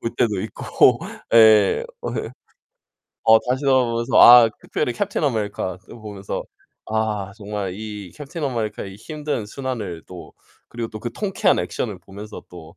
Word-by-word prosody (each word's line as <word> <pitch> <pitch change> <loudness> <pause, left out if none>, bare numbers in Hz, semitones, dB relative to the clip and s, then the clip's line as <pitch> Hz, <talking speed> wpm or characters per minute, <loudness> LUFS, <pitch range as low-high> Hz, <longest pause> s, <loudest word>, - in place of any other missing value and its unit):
볼 115 - -4
때도 105 -5 +1
있고 110 - +2 0.3
예 110 - +6 0.2
어 - - -4
이 - - -4 1.0
어 110 - +9
다시 130 +3 -1
돌아 130 -2 +4
보면서 115 0 0
아 120 -1 +10
특별히 125 - -2
캡틴 205 -3 -2
아메리카 105 -7 -2
그거 115 - -14
보면서 100 -2 -6 0.4
아 110 -3 -2
정말 100 -3 -5
이 105 -2 -8
캡틴 150 +2 -7
아메리카의 110 -6 -3
힘든 150 0 -4
순환을 110 - -5
또 90 -2 -11 0.4
그리고 115 -1 -5
또 110 -1 -9
그 120 +1 -5
통쾌한 200 -3 +1
액션을 105 -6 -3
보면서 100 +4 -10
또 85 0 -13
110 Hz, 295 characters per minute, -22 LUFS, 100-120 Hz, 1.0 s, 아